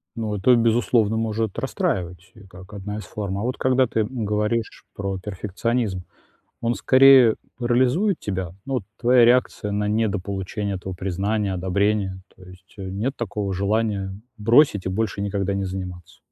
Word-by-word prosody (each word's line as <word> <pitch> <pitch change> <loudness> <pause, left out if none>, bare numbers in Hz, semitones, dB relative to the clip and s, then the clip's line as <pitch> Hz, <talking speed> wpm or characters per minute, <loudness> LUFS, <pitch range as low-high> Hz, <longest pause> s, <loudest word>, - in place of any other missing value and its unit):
Ну, 110 -2 -3
это, 120 +6 +4
безусловно, 115 -1 +2
может 110 -2 -2
расстраивать 90 +1 -3
и 110 - -15
как 95 0 -14
одна 105 +1 -5
из 105 - -6
форм. 100 +1 -5
А 105 - -3
вот 125 +1 -2
когда 130 -1 +2
ты, 115 - 0
м, 115 +1 -3
говоришь 105 +2 -1
про 100 -1 -3
перфекционизм, 105 +1 -2 0.6
он 120 +1 +1
скорее 130 -3 +6 0.2
парализует 130 - +2
тебя? 95 -3 -3
Ну 135 - -3
вот, 120 - -1
твоя 125 0 +5
реакция 120 -4 +2
на 105 0 -1
недополучение 100 -1 -2
этого 95 +1 -6
признания, 100 +3 -1
одобрения? 95 +1 0
То 95 - -19
есть, 90 +1 -16
э, 95 - -6
нет 105 +8 -2
такого 105 -3 -3
желания 100 0 -1 0.2
бросить 115 -2 +4
и - - +1
больше 105 +2 -2
никогда 100 -1 -1
не 100 0 -1
заниматься? 90 -2 -7
105 Hz, 160 wpm, -23 LUFS, 95-115 Hz, 0.6 s, скорее